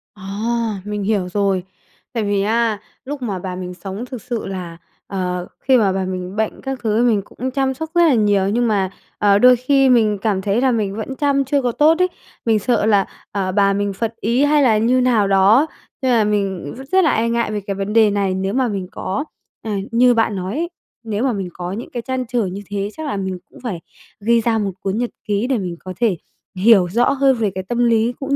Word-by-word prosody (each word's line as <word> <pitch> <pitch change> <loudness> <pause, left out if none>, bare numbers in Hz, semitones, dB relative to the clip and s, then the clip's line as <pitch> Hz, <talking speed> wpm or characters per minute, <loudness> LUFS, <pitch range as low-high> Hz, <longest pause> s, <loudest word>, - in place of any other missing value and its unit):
À, 210 +1 -2
mình 210 -1 -3
hiểu 195 -3 0
rồi. 195 -1 0 0.5
Tại 230 -3 -1
vì 205 -1 +1
á, 220 0 +1 0.3
lúc 285 0 -5
mà 205 -6 -3
bà 180 0 -5
mình 180 -1 -6
sống 195 +6 -6
thực 250 -2 -8
sự 245 -2 -4
là, 180 -3 -6 0.3
ờ 180 -2 -3
khi 260 -1 +4
mà 205 -5 +3
bà 190 0 -1
mình 185 +1 -5
bệnh 220 0 -2
các 270 -2 -4
thứ 215 -1 +1
thì 245 - +4
mình 210 -3 +2
cũng 255 +6 -6
chăm 265 0 0
sóc 320 +4 -6
rất 345 - +5
là 300 - +4
nhiều, 205 -4 +2
nhưng 240 +2 +1
mà, 195 -3 +1 0.3
ờ, 200 -1 +4
đôi 250 +2 +7
khi 270 +2 +3
mình 220 -4 +4
cảm 200 -3 0
thấy 205 +4 0
là 265 - +3
mình 210 -4 -1
vẫn 225 +5 -5
chăm 280 -1 +1
chưa 280 +1 +1
có 245 - 0
tốt 305 +6 +4
ấy, 365 - +4 0.4
mình 225 -2 +3
sợ 235 -1 +1
là, 205 -3 +3 0.3
à, 195 -2 -1
bà 200 0 +3
mình 200 0 -1
phật 230 +3 -3
ý 240 +6 +2
hay 295 0 +4
là 225 -5 +4
như 245 +4 +3
nào 235 -5 +3
đó, 200 +9 +5 0.3
nên 260 -1 +1
là 225 -3 +4
mình 195 -7 -1
r - - -10
rất 380 0 +5
là 320 - +4
e 230 +1 +1
ngại 235 -2 0
về 210 -1 -2
cái 195 0 -4
vấn 200 +2 -3
đề 220 -2 +5
này. 200 -2 0
Nếu 190 +1 -2
mà 255 0 +2
mình 195 -4 -3
có 230 +10 -3 0.4
à, 220 - -5 0.2
như 245 +1 +5
bạn 225 -3 +1
nói 185 +1 -4
ấy, 340 +2 -1 0.3
nếu 220 +1 -2
mà 260 - +1
mình 195 -3 -4
có 175 0 -5
những 215 +5 -6
cái 240 - -4
trăn 260 +1 -3
trở 240 -3 0
như 190 +2 -5
thế 200 0 -2
chắc 315 - -6
là 205 - -2
mình 190 -1 -3
cũng - - -16
phải 200 -9 -3 0.4
ghi 230 +2 +3
ra 225 0 +1
một 205 -2 -1
cuốn 195 +2 -2
nhật 245 0 -1 0.2
ký 210 +3 0
để 265 - +1
mình 180 -4 -4
có 185 0 -7
thể 215 -8 +2 0.4
hiểu 195 -2 +5
rõ 235 +7 +2
hơn 270 -1 +3
về 220 -4 0
cái 190 - -3
tâm 240 +6 -3
lý 230 +1 +2
cũng 280 0 -1
215 Hz, 245 wpm, -19 LUFS, 195-245 Hz, 0.5 s, đôi